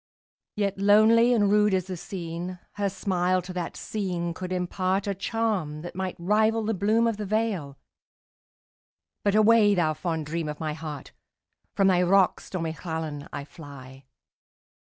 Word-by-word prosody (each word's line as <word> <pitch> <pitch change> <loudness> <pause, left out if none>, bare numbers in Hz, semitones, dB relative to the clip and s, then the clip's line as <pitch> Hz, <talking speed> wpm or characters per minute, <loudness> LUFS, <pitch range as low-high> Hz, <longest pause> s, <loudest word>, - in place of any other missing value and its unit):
Yet 200 -2 -1
lonely 215 +4 +5
and 205 -4 +3
rude 210 -1 +4
as 185 -2 -1
the 185 -1 -5
scene, 175 0 -6
Her 200 -1 -1
smile 185 -1 0
to 180 +1 -8
that 175 -2 -4
scene 180 -5 -3
could 185 +2 -6
impartA 185 +2 -1
charm 200 -10 -2
that 175 - -7
might 190 -1 -3
rival 215 +5 +2
the 220 +1 0
bloom 215 +4 +2
of 230 -2 0
the 210 - -4
vale,—But 205 +1 -6
away, 215 -1 +5
thou 160 -4 +2
fond 160 -1 -3
dream 160 0 -3
of 150 - -6
my 155 -1 -2
heart! 150 -3 -7 0.6
From 195 - +3
thy 180 -2 +4
rocks, 190 +1 +3
stormy 165 -4 -3
Llannon, 160 -3 -5
I 140 - -5
fly. 135 -4 -12
185 Hz, 150 wpm, -26 LUFS, 165-205 Hz, 0.6 s, lonely